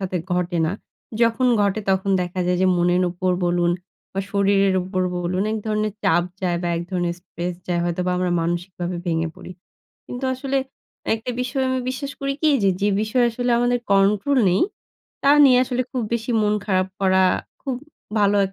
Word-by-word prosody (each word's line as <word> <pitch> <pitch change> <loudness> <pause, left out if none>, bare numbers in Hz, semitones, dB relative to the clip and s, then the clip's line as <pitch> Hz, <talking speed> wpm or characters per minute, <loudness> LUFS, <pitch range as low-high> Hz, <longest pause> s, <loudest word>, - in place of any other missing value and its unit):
সাথে 185 -1 -2 0.2
ঘটে 180 -1 0
না। 165 - -1 0.5
যখন 230 +2 +3
ঘটে, 200 +1 +1
তখন 190 +1 +1
দেখা 180 +1 -4
যায় 180 - +2
যে, - - +4
মনের 175 +1 +2
উপর 185 +1 -1
বলুন 175 0 +2 0.4
বা 195 - -1
শরীরের 200 -1 +3
উপর 185 0 -2
বলুন, 175 +2 -1
এক 220 - -1
ধরনের 215 -1 0
চাপ 190 -3 +3 0.2
যায় 175 -2 0
বা 175 - -1
এক 170 - -2
ধরনের 175 -2 -1
স্ট্রেস 175 0 -5
যায়, 175 -1 0
হয়তোবা 180 +1 -1
আমরা 180 0 0
মানসিকভাবে 175 +1 -3
ভেঙে 165 -1 0
পড়ি। - - -11 0.6
কিন্তু, 245 +2 -5
আসলে 270 +1 -2 0.6
একটা 225 +3 -3
বিষয় 260 +2 -1
আমি 260 - 0
বিশ্বাস 275 +2 -4
করি 275 0 -1
কি 310 - +4
যে, 195 - +5
যে, 205 - +3
বিষয় 220 +3 +1
আসলে 245 +1 -1
আমাদের 245 0 +2
কন্ট্রোল 205 +8 +3
নেই, 180 +2 +2 0.6
তা 275 - +5 0.2
নিয়ে 255 -2 +6
আসলে 255 0 -1
খুব 255 - -2
বেশি 235 +1 -2
মন 210 0 +2
খারাপ 185 -2 +1
করা, 190 -1 +3 0.4
খুব 265 -2 -3 0.4
ভালো 205 0 +3
195 Hz, 180 wpm, -22 LUFS, 180-235 Hz, 0.6 s, নিয়ে